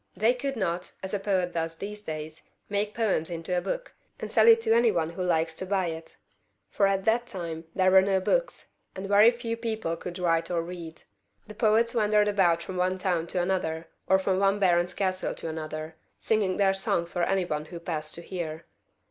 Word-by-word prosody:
They 220 +5 +4
could 270 +2 -3
not, 180 -4 -2
as 190 - -5
a 205 - 0
poet 185 -3 0
does 165 0 -2
in - - -3
these 210 0 -9
days, 155 -3 -6 0.3
make 205 +1 -1
poems 200 -8 0
into 170 +1 -3
a 175 - +1
book, - - -4 0.3
and - - -6
sell - - +5
it 455 0 +8
to 340 - +2
any 235 0 +4
one 165 -3 -1
who 170 - -6
likes 165 -2 +1
to 190 - -4
buy 190 -3 +1
it; 160 0 -8 0.5
for 200 - +3
at 195 -1 0
that 235 +3 +2
time 170 -5 -6
there 185 -1 +4
were 190 0 +8
no 190 0 +2
books, - - -1 0.3
and 190 +1 -5
very 205 +3 +7
few 235 -1 -3
people 220 -6 -3
who 165 - -2
could 180 0 -7
write 165 -2 +1
or 170 -2 0
read. 170 -2 -8 0.4
The 215 - -10
poets 225 +2 +2
wandered 210 -2 +3
about 175 -5 +2
from 185 +1 -6
one 185 +1 +1
town 180 -3 -1
to 180 - 0
another, 165 -3 -2 0.2
or 190 - +5
from 190 0 0
one 195 0 +3
baron's 175 -3 +2
castle 185 -2 -1
to - - -6
another, 155 0 -6 0.2
singing 205 -4 0
their 195 -1 +3
songs 170 -3 -1
for 175 - -1
any 190 +1 +1
one 150 -2 -3
who 170 +1 -8
passed 155 -3 -4
to 170 - -6
hear. 165 -3 -5
185 Hz, 215 wpm, -27 LUFS, 165-205 Hz, 0.5 s, it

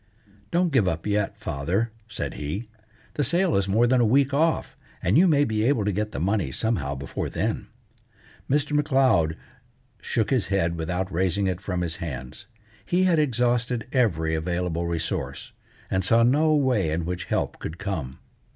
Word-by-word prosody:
"Don't 175 0 +1
give 115 -8 +4
up 80 -2 -2
yet, 105 -1 0
father," 95 +12 -1 0.2
said 105 - -4
he. 80 +11 -4 0.5
"The 145 - 0
sale 175 +4 +2
is 100 -1 +1
more 110 +5 +3
than 125 +1 +3
a - - +4
week 135 +4 +3
off, 160 +3 +1 0.3
and 90 +6 +2
you 185 +4 +6
may 145 -3 +4
be 110 -3 0
able 115 -4 +2
to 105 - +1
get 105 +2 -2
the - - -4
money 95 -3 0
somehow 70 - -1
before 70 +1 -4
then." 110 0 -2 0.8
Mr. 145 +2 +1
M'Leod 130 - +2 0.6
shook 115 +1 -1
his 120 -9 +2
head 85 -3 +1
without 90 +3 -3
raising 95 +3 +1
it 95 -1 -1
from 90 -1 -2
his 85 -1 -2
hands. 65 -6 -7 0.4
He 180 - +1
had 175 -4 +3
exhausted 120 -3 +1
every 85 - +1
available 85 +1 -1
resource, 85 -1 -3 0.4
and 95 0 +1
saw 115 +5 +4
no 150 +6 +4
way 125 - +2
in 80 +2 -1
which 90 0 -3
help - - -2
could 80 - -6
come. 85 -10 -4
105 Hz, 170 wpm, -25 LUFS, 85-130 Hz, 0.8 s, you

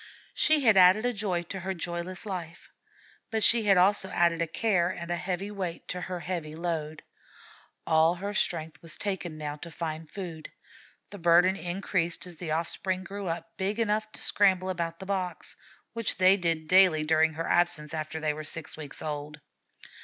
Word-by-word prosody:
She 310 -1 +3
had 220 -6 +5
added 185 +5 +6
a 245 - +1
joy 195 -5 -1
to 190 +3 -6
her 190 +1 -3
joyless 175 +2 -4
life, 175 -5 -6 0.6
but 220 -2 0
she 230 -2 +5
had 195 -2 +5
also 190 +1 +3
added 170 -2 +2
a 170 - +1
care 180 0 +1
and 170 -2 -5
a - - +1
heavy 185 +3 -3
weight 185 -5 -5
to 180 - -3
her 180 -1 -5
heavy 170 -4 -4
load. 160 -2 -3 0.8
All 160 +1 +4
her 200 +3 -4
strength 165 -4 -1
was 165 -2 0
taken 175 -6 -3
now 150 -1 -5
to 170 - -8
find 160 -1 -5
food. 170 -5 -7 0.6
The 200 - -8
burden 175 +2 +5
increased 175 -2 -2
as 175 -2 -10
the 170 -1 -6
offspring 185 +4 -1
grew 200 0 -6
up 165 0 -5
big 200 +4 -1
enough 215 -1 0
to - - -6
scramble 190 -2 +3
about 170 -2 -3
the 190 - -9
boxes, 185 -2 -3 0.4
which 230 -2 0
they 185 +1 +6
did 165 -4 -1
daily 185 -3 +6
during 160 0 +3
her 165 +1 -4
absence 160 -3 +1
after 155 0 -4
they 155 -1 0
were 155 +1 -6
six 160 +1 -6
weeks 150 -3 -7
old. 150 -1 -5
175 Hz, 185 wpm, -28 LUFS, 160-190 Hz, 0.8 s, added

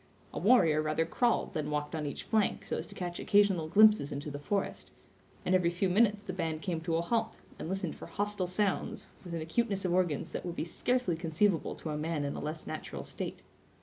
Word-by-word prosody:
A - - -3
warrior 165 -8 +5
rather 155 +1 +1
crawled 235 +8 +1
than 155 -3 -2
walked 150 0 -2
on 155 -2 -2
each 140 - -5
flank 215 -3 +1
so - - -2
as - - -4
to - - -12
catch 175 -1 -4
occasional 200 -6 +3
glimpses 210 -4 +6
into 145 +1 -4
the 145 - -5
forest; 195 +7 -2 0.6
and 180 - +2
every 180 -2 +4
few 175 +2 0
minutes 210 +1 +3
the 185 - -5
band 160 -3 -2
came 170 -4 -2
to 165 0 -1
a 165 - +2
halt, 225 +4 0 0.2
and - - -5
listened 190 -3 -2
for - - -9
hostile 205 -2 -1
sounds, 195 +2 -1 0.2
with 175 -2 -5
an 165 - -3
acuteness 195 +4 0
of 175 - +1
organs 175 -6 +1
that - - -4
would 175 -1 -4
be - - -2
scarcely 245 +1 0
conceivable 165 +2 +1
to 155 - -5
a 150 - -2
man 155 -1 -1
in 140 - -3
a - - -4
less 155 +1 -4
natural - - -5
state. - - -6
175 Hz, 220 wpm, -31 LUFS, 160-205 Hz, 0.6 s, glimpses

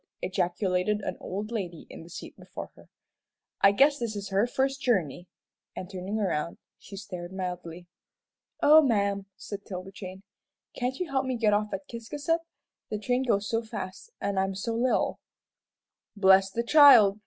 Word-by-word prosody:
ejaculated 185 +2 0
an - - -3
old 205 +4 -5
lady 180 -8 -4
in - - -9
the 165 - -13
seat 175 - -9
before - - -9
her, - - -18 0.7
"I 195 - +7
guess 280 +7 +4
this 230 -3 -3
is 200 -1 -5
her 200 +4 +2
first 270 +2 -1
journey," 180 - 0 0.5
and 185 +1 -7
turning 190 +3 -3
around, 170 -5 -1 0.2
she 195 - -11
stared 180 -3 -7
mildly. 180 -2 -5 0.8
"Oh, 310 +2 +8
ma'am," 200 -7 +1
said 205 -1 -7
'Tilda 185 0 -7
Jane, 190 0 -9 0.5
"can't 255 +1 -2
you 360 -5 -4
help 265 -1 0
me 260 - -1
get 215 -2 +3
off 210 0 0
at 195 0 -5
Ciscasset? 290 +8 -2 0.5
The 215 - -2
train 245 +4 0
goes 210 -5 +1
so 225 -1 0
fast, 210 - -7
an' 200 -1 -1
I'm 195 0 0
so 225 +4 -3
little." 245 +2 +1 1.0
"Bless 190 -1 +5
the 230 +5 -2
child!" 235 -7 +7
200 Hz, 165 wpm, -28 LUFS, 190-235 Hz, 1.0 s, Oh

